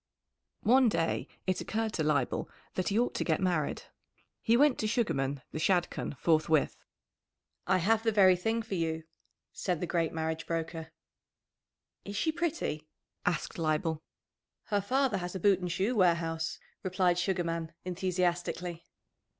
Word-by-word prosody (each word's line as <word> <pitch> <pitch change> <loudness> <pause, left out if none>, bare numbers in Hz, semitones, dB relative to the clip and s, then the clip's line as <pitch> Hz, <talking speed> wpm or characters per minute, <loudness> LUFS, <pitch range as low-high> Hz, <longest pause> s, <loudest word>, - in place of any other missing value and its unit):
_ - - -3
One 255 +1 +6
day 165 -5 0 0.2
it 185 -1 0
occurred 220 0 -2
to 160 - 0
Leibel 150 -1 0 0.2
that 185 - -1
he 205 - +1
ought 245 +1 +2
to - - -1
get 160 - +1
married. 175 -6 0 0.6
He 230 +1 +4
went 285 -1 +4
to 215 - 0
Sugarman 140 - 0
the 155 - -4
Shadchan 175 -4 0
forthwith. 155 0 +2 0.8
"I 185 0 +4
have 215 +5 +3
the 225 0 +2
very 190 -3 +6
thing 225 +6 -1
for 220 - -6
you," 160 -2 -1 0.5
said 180 -4 -1
the 180 - -1
great 165 -2 0
marriage 160 0 -3
broker. 165 -1 -3 1.1
"Is 200 - -7
she 320 +10 +1
pretty?" 310 - -2 0.4
asked 175 0 -1
Leibel. 155 0 0 0.6
"Her 205 -1 0
father 255 +1 +1
has 180 +1 -5
a - - -2
boot 195 0 +4
and 180 -1 -3
shoe 195 +8 0
warehouse," 170 -4 +1 0.2
replied 180 -1 +1
Sugarman 170 -3 -1
enthusiastically. 180 -1 -1
180 Hz, 150 wpm, -31 LUFS, 165-205 Hz, 1.1 s, One